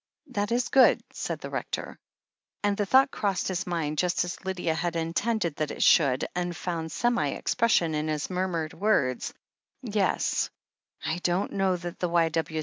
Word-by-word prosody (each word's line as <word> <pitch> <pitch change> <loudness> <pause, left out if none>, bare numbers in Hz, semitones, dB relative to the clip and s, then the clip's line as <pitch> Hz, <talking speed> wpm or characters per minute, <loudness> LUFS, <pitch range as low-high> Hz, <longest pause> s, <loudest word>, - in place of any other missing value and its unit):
"That 205 -2 -1
is 240 +1 +1
good," 265 -2 +6
said - - -4
the - - -7
Rector. - - -4 0.6
And 205 0 +2
the 205 0 -1
thought 265 +5 +5
crossed 195 -4 -1
his 185 -1 -2
mind, 155 -4 -1
just 180 0 +1
as 175 - -7
Lydia 180 -3 -1
had 170 +1 -2
intended 170 +1 -1
that 155 -1 -1
it - - -1
should, 135 -5 +4
and 175 -1 -2
found 165 -3 -3
semi 240 +1 +1
expression 225 -9 +1
in 150 0 -1
his 155 -1 -1
murmured 180 -4 -2
words: 160 - +1 0.5
"Yes - - 0 0.3
— - - -17
I 160 +2 -1
don't 180 +3 0
know 190 -2 +1
that 175 0 -7
the 180 - 0
Y. 170 -1 +3
175 Hz, 170 wpm, -27 LUFS, 165-200 Hz, 0.6 s, good